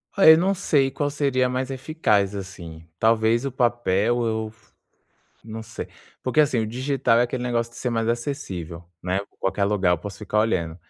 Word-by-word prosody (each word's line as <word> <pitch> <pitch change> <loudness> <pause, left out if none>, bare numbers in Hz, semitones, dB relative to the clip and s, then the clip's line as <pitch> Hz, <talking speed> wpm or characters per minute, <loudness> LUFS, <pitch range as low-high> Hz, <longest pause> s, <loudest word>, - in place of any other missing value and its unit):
Ai, 160 -6 +8
não 185 +4 +2
sei 145 -8 +2
qual 145 +2 -2
seria 135 -3 +1
mais 130 +1 -2
eficaz, 125 - 0
assim. 85 -5 -8 0.2
Talvez 115 +2 +3
o 135 - -2
papel? 120 -1 +1
Eu 110 -1 -1
f 110 -4 -29 0.7
não 110 0 -7
sei. 115 0 -7 0.3
Porque 130 +4 +2
assim, 145 -5 +2
o 110 - 0
digital 125 0 +1
é - - +5
aquele 125 +1 -2
negócio 120 -1 -1
de - - -12
ser 125 - -2
mais 115 -1 -1
acessível, 110 - -4 0.2
né. 95 +2 0 0.2
Qualquer 95 +1 -1
lugar 100 -3 +1
eu 90 - +2
posso 100 +2 -8
ficar 105 0 0
olhando, 85 -7 0
115 Hz, 180 wpm, -24 LUFS, 100-130 Hz, 0.7 s, Ai